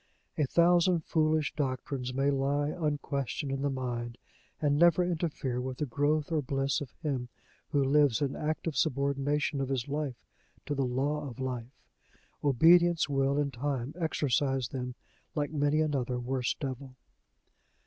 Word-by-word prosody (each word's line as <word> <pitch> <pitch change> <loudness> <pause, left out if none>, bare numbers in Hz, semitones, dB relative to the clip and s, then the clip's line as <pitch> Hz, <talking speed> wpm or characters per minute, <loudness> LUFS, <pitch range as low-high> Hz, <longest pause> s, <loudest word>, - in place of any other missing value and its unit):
A 150 - +2
thousand 175 +1 +4
foolish 155 -1 +1
doctrines 130 -2 -2
may 135 +2 +1
lie 140 +2 +1
unquestioned 145 -3 -2
in 135 0 -2
the 140 - +1
mind, 120 -3 -4 0.4
and 145 -2 +2
never 170 +3 +5
interfere 155 -8 -2
with 130 0 -4
the 150 - -1
growth 145 +4 0
or 155 -2 +2
bliss 135 +1 -1
of 140 - -6
him 130 -5 -2 0.4
who 145 -3 +2
lives 140 -2 +4
in 140 -2 -1
active 155 0 -2
subordination 140 0 0
of 135 - -2
his 130 -2 -1
life 140 - -4 0.4
to 145 - -2
the 135 -2 0
law 140 +3 -1
of 120 - -11
life: 125 -1 -5 0.6
obedience 165 +4 +5
will 135 0 +1
in 145 -1 0
time 135 +1 -3
exorcise 135 -6 0
them, 125 -2 -5 0.4
like 145 -1 -1
many 145 0 +2
another 130 -5 0
worse 125 0 -1
devil. 130 -2 -6
140 Hz, 150 wpm, -30 LUFS, 130-150 Hz, 0.6 s, never